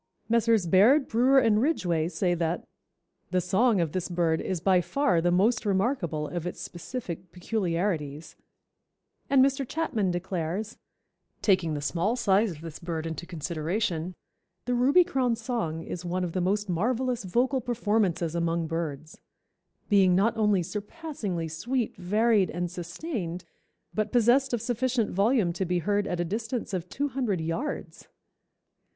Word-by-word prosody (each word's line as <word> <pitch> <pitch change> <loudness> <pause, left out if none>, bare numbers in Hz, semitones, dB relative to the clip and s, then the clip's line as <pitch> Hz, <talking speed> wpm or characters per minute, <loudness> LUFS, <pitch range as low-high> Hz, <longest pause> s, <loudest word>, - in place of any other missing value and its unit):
Messrs. 230 -3 +3
Baird, 220 - +5
Brewer 255 +4 +4
and 225 -4 +4
Ridgway 175 - +1
say 175 +1 0
that 170 0 -1 0.6
"The 185 - +1
song 195 +5 +2
of 165 -3 0
this 185 +1 -3
bird 170 -2 +1
is 185 -3 -2
by 185 +1 +3
far 185 -6 +1
the 175 - +2
most 200 +7 +2
remarkable 190 - 0
of 175 +1 -4
its 180 - -6
specific 180 -2 -6
peculiarities," 175 -6 -2 0.9
and 270 -1 +6
Mr. 275 0 0
Chapman 245 - -1
declares, 180 +3 -3 0.6
"Taking 185 -6 +2
the 145 - -3
small 180 +9 0
size 215 -2 +3
of 160 -4 -8
the 165 -2 -8
bird 165 -2 -3
into 165 +1 -5
consideration, 170 +1 -2 0.5
the 250 - 0
Ruby 270 +9 +5
crown's 255 -9 0
song 165 -11 -3
is 175 - -6
one 180 +1 -2
of 175 - -2
the 185 - -1
most 200 +3 0
marvellous 240 +7 0
vocal 250 +8 +1
performances 210 -8 0
among 170 0 0
birds; 160 -2 -4 0.7
being 190 -3 +5
not 205 +5 +2
only 210 -4 +2
surpassingly 210 - -4
sweet, 230 +10 -2
varied 210 +2 +2
and 175 0 -3
sustained, 180 - -5 0.5
but 215 0 -1
possessed 250 +3 +4
of 235 -2 -1
sufficient 245 -1 0
volume 200 -2 +2
to 185 - -2
be 180 0 0
heard 205 +4 0
at 175 - -2
a 175 - 0
distance 220 +4 -3
of 180 -1 -3
two 285 +6 -2
hundred 245 -8 -1
yards. 165 - -4
190 Hz, 150 wpm, -27 LUFS, 170-235 Hz, 0.9 s, and